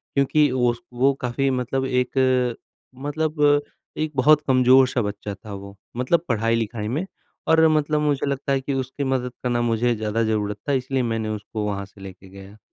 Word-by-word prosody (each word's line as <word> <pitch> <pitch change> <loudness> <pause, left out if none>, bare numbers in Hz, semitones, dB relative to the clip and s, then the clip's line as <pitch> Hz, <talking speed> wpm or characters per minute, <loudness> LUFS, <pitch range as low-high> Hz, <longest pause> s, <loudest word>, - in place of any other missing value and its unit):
क्योंकि 140 +1 +3
उस 125 +3 +1
वो 135 +3 +3
काफ़ी 130 +2 0
मतलब 130 +1 -1
एक 125 0 -1
अ, 130 -2 +2 0.5
मतलब 155 +1 -2
अ, 145 0 +5 0.4
एक 155 -1 -1
बहुत 150 +3 +5
कमज़ोर-सा 130 0 +5
बच्चा 105 -1 -4
था 105 0 -10
वो, 100 0 -9 0.2
मतलब 160 +7 +1
पढ़ाई-लिखाई 115 -1 -1
में। 150 +11 -2 0.4
और 160 0 +5
मतलब 150 -1 +1
मुझे 145 -2 0
लगता 140 0 -2
है 135 - 0
कि 140 +1 -3
उसकी 130 +1 -3
मदद 130 -2 -1
करना 120 -1 0
मुझे 120 +1 +1
ज़्यादा 110 +1 -1
ज़रूरत 105 -2 -1
था - - +2
इसलिए 130 0 -1
मैंने 115 -2 -2
उसको 105 0 -4
वहाँ 100 -1 -3
से 100 0 -18
लेके 95 0 -11
गया। 100 +2 -13
125 Hz, 180 wpm, -23 LUFS, 110-140 Hz, 0.5 s, अ